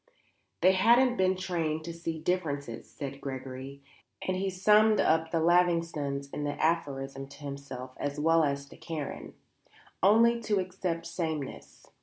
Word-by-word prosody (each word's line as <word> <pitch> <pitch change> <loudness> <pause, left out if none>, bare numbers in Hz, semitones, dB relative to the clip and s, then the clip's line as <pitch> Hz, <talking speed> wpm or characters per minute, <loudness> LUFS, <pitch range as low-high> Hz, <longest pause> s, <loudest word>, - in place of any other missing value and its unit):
"They 185 - +6
haven't 240 +6 +4
been 190 -2 +2
trained 165 -4 -2
to 170 +1 -6
see 165 -1 -4
differences," 145 -8 -2
said 140 -1 -7
Gregory, 135 +1 -7 0.4
and 185 - +1
he 190 +1 -1
summed 210 +3 +4
up 160 0 +3
the 165 - 0
Lavingtons 165 -5 +1
in 150 - -3
the 145 0 -3
aphorism 135 -4 -1
to 140 +1 -14
himself 140 -2 -7
as 145 0 -3
well 165 +1 +4
as 140 -1 -1
to - - -14
Karen; 160 -3 -6 0.7
"only 230 +5 +5
to 210 -3 +1
accept 180 -2 -3
samenesses." 160 -5 -5
160 Hz, 145 wpm, -29 LUFS, 140-185 Hz, 0.7 s, They